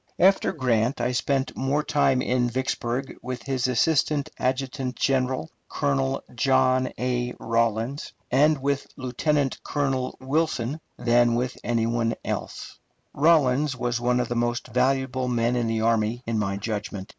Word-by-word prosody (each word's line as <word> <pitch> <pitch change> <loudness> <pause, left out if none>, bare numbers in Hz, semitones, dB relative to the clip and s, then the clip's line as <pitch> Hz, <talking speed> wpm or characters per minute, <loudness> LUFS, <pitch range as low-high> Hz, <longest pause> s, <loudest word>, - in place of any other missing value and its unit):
After 190 +2 +4
Grant, 125 - 0
I 125 - 0
spent 135 +2 -1
more 140 +3 0
time 135 -4 +2
at 125 -1 +1
Vicksburg 130 +1 -2
with 125 -1 -5
his 130 -2 -1
assistant 145 +3 +1
adjutant 130 0 -2
general, 130 +2 0 0.2
Colonel 135 -2 0
John 130 +1 +2
A. 125 -1 -1
Rawlins, 115 +4 -1 0.2
and 150 +4 +4
with 140 +1 -1
Lieutenant 135 +2 -1
Colonel 135 -3 -1
Wilson, 140 0 -1 0.2
than 120 0 +3
with 125 +1 -1
anybody 115 0 0
else. - - -5 0.3
Rawlins 145 -3 +3
was 120 -1 -2
one 125 0 +2
of 125 - 0
the 120 - -3
most 120 0 -1
valuable 130 0 +1
men 120 0 +1
in 120 -2 0
the 115 -1 0
army, 115 +1 +1
in 115 -1 -1
my 100 -1 -1
judgment. 100 -2 -4
125 Hz, 140 wpm, -25 LUFS, 120-135 Hz, 0.3 s, After